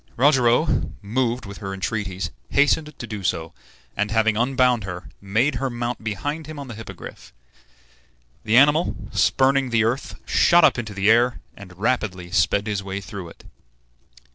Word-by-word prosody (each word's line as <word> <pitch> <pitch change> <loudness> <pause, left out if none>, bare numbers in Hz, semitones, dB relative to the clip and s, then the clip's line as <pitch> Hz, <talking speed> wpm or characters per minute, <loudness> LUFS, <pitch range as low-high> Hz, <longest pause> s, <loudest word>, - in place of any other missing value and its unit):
Rogero, 130 +2 +3
moved 120 +3 -1
with 100 0 -9
her 95 -2 -5
entreaties, 95 -2 -3 0.2
hastened 150 +1 +2
to - - -6
do 105 -3 -6
so, 85 -2 -2 0.4
and, 105 +1 0
having 110 0 +2
unbound 125 -1 +2
her, 90 -1 -7
made 110 +9 +1
her 135 - 0
mount 120 -1 -4
behind 145 +9 -4
him 155 -1 -8
on 140 -2 -7
the 120 - -7
Hippogriff. 110 +1 -10 1.1
The 110 +1 +3
animal, 150 +5 +4 0.2
spurning 135 0 +2
the 115 -1 +2
earth, 120 +5 -2
shot 175 0 +4
up - - +3
into 110 -3 -6
the 100 +2 +3
air, 120 +1 +3 0.2
and 95 -3 -13
rapidly 95 -5 -1
sped 100 +2 +2
his 105 -2 -2
way 95 0 -5
through 95 -3 -8
it. - - -16
110 Hz, 160 wpm, -23 LUFS, 100-130 Hz, 1.1 s, animal